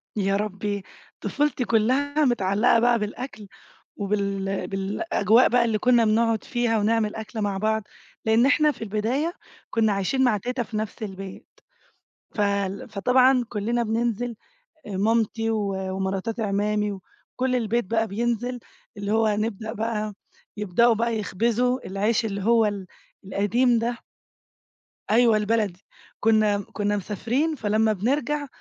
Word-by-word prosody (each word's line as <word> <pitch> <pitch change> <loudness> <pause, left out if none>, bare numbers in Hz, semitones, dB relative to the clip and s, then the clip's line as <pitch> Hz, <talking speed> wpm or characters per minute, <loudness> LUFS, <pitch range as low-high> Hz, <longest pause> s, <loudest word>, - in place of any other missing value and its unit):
يا 195 -1 +1
ربي، 205 -1 -2 0.4
طفولتي 290 -4 0
كلّها 275 +7 +2
متعلقة 225 -1 +3
بقى 240 0 +3
بالأكل 215 0 -6 0.5
وبال 195 -1 -2
بالأجواء 205 - +2
بقى 240 0 +3
اللي 225 -2 +1
كنّا 240 +1 +4
بنقعد 225 0 +2
فيها 240 -3 0
ونعمل 215 0 +1
أكل 220 0 -5
مع 200 -2 -1
بعض، 220 +1 0 0.4
لأن 225 +2 +4
إحنا 300 +2 +4
في 255 - -8
البداية 235 - -1 0.4
كنّا 220 -2 +2
عايشين 200 +7 0
مع 240 -5 +3
تيتا 245 +4 -3
في 220 -1 -6
نَفْس 215 0 -4
البيت. 195 -1 -8 0.9
فال 200 -2 -1
فطبعًا 250 +4 +3
كلّنا 235 +3 -1
بننزل 235 +1 -1 0.5
أ 200 -3 -5
مامتي 225 +2 +1
و 210 -3 -1 0.2
ومراتات 195 +4 -2
إ - - 0
عمّامي 210 0 0
وكل 250 +6 -4
البيت 235 0 0
بقى 225 +3 0
بينزل 240 +3 -2 0.4
اللي 205 0 -3
هو 225 0 +3
هنبدأ 215 +1 -1
بقى، 215 -1 -2 0.4
يبدأوا 210 +4 +3
بقى 230 0 0
يخبزوا 235 +5 0
العيش 210 +4 0
اللي 200 -2 -3
هو 230 0 +4
ال 200 -3 -3 0.4
القديم 230 +6 +2
ده. 235 +1 -1 1.1
أيوَه 230 0 +5
البلدي 210 -3 0 0.4
كنّا 215 -2 +3
م - - -4
كنّا 205 0 0
مسافرين 230 - -1
فلمّا 220 -2 +1
بنرجَع 280 +8 -1
220 Hz, 135 wpm, -24 LUFS, 205-240 Hz, 1.1 s, أيوَه